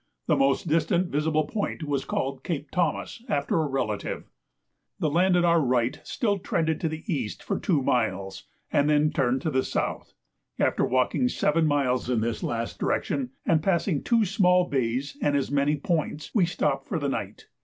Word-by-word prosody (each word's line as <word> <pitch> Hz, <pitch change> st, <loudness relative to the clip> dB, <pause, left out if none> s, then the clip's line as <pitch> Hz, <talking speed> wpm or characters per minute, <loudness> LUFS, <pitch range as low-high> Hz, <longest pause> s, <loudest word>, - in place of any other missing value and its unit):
The -, -, +3 dB
most 135 Hz, +4 st, +2 dB
distant 165 Hz, +3 st, +1 dB
visible 155 Hz, +1 st, +1 dB
point 200 Hz, -1 st, -3 dB
was 145 Hz, -3 st, -2 dB
called 135 Hz, 0 st, -3 dB
Cape 150 Hz, -4 st, -4 dB
Thomas 180 Hz, +6 st, -1 dB
after 145 Hz, +2 st, +1 dB
a 155 Hz, -, 0 dB
relative. 120 Hz, -7 st, -3 dB, 0.7 s
The 155 Hz, -, 0 dB
land 180 Hz, +3 st, +3 dB
on 175 Hz, -, +3 dB
our 170 Hz, -1 st, +4 dB
right 125 Hz, -2 st, +1 dB
still 205 Hz, -5 st, -1 dB
trended 160 Hz, -3 st, -1 dB
to 165 Hz, -, 0 dB
the 160 Hz, 0 st, -6 dB
east 140 Hz, -, -3 dB
for -, -, -2 dB
two 155 Hz, -8 st, +1 dB
miles, 100 Hz, -7 st, -1 dB, 0.3 s
and 145 Hz, +1 st, +3 dB
then 150 Hz, 0 st, +3 dB
turned 130 Hz, +1 st, 0 dB
to 160 Hz, -, 0 dB
the 130 Hz, -1 st, +2 dB
south. -, -, -3 dB, 0.4 s
After -, -, +1 dB
walking 130 Hz, -, +2 dB
seven 160 Hz, -7 st, +2 dB
miles 130 Hz, -4 st, +1 dB
in 120 Hz, -3 st, +1 dB
this 115 Hz, 0 st, -2 dB
last 115 Hz, -1 st, -3 dB
direction, 135 Hz, -3 st, -1 dB, 0.2 s
and 160 Hz, -2 st, +3 dB
passing 170 Hz, -3 st, +1 dB
two 230 Hz, -2 st, +2 dB
small 180 Hz, -2 st, +3 dB
bays 130 Hz, +1 st, -1 dB
and 145 Hz, -1 st, +2 dB
as 140 Hz, -1 st, -2 dB
many 145 Hz, +1 st, +2 dB
points, 150 Hz, -1 st, -2 dB
we 190 Hz, -6 st, +3 dB
stopped 140 Hz, -5 st, -1 dB
for 185 Hz, -, -2 dB
the 145 Hz, -2 st, -1 dB
night. 105 Hz, -6 st, -4 dB
150 Hz, 180 wpm, -26 LUFS, 130-170 Hz, 0.7 s, our